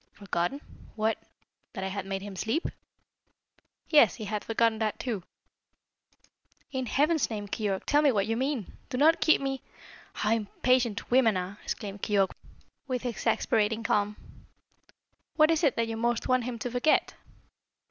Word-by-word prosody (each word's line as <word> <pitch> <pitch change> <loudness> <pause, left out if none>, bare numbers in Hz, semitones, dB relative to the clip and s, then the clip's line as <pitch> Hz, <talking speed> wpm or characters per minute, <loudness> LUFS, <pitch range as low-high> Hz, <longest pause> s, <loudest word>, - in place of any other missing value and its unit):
"Forgotten? 200 +6 -2 0.3
What? 220 0 0 0.5
That 190 - -5
I 190 - -2
had 195 0 -5
made 195 0 -3
him 200 -1 -7
sleep?" 225 - -1 1.2
"Yes. 300 -2 +6
He 220 - -6
had 210 0 -3
forgotten 225 -1 +1
that 215 -2 -1
too." 230 -7 -3 1.5
"In 260 -2 -2
Heaven's 300 +5 +2
name, 210 -2 -4
Keyork, 200 -2 -2
tell 295 0 +4
me 290 -2 +5
what 200 -4 +1
you 225 +2 -1
mean! 260 -4 -2
Do 250 - -3
not 315 +5 +4
keep 315 - +5
me 270 -1 -3 0.3
" - - -20
"How 210 - 0
impatient 230 +1 +1
women 235 -5 +4
are!" 185 +3 -5
exclaimed 200 -1 -5
Keyork 200 -3 +2 0.6
with 255 -1 -3
exasperating 225 -2 0
calm. 210 -1 +1 1.2
"What 310 0 +5
is 325 +1 +1
it 280 -6 +3
that 230 0 0
you 225 - -3
most 235 0 0
want 255 -2 +2
him 245 -1 -4
to 240 +2 -4
forget?" 250 +5 +2
225 Hz, 155 wpm, -28 LUFS, 205-260 Hz, 1.5 s, Yes